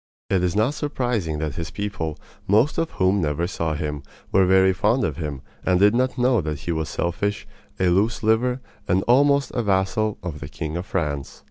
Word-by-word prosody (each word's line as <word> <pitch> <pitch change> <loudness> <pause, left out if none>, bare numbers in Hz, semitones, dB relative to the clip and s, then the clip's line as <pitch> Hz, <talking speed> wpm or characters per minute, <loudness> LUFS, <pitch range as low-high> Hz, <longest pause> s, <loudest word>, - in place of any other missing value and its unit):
It 95 -2 +3
is 90 0 0
not 110 +7 +2
surprising 120 - -2
that 75 -2 -2
his 85 -1 -4
people, 90 -7 -4 0.3
most 110 +9 +3
of 165 0 0
whom 95 +1 +2
never 75 +2 0
saw 80 -3 -2
him, 75 -1 -3 0.3
were 95 -1 +4
very 95 0 +5
fond 110 +8 +2
of 75 -3 -1
him, 75 -5 -5 0.2
and 90 -1 +2
did 105 +2 +5
not 130 +2 +1
know 125 -3 +3
that 75 -2 -4
he 85 - -3
was 80 -3 -2
selfish, 95 +6 -2 0.3
a 95 - +3
loose 105 +6 +1
liver, 125 +4 +2 0.3
and 95 +1 +2
almost 140 +3 +3
a 120 - -1
vassal 100 +1 +1
of 80 -5 -5
the 70 - -7
king 80 0 -5
of 90 +3 -4
France. 75 -6 -3
95 Hz, 200 wpm, -23 LUFS, 80-110 Hz, 0.3 s, very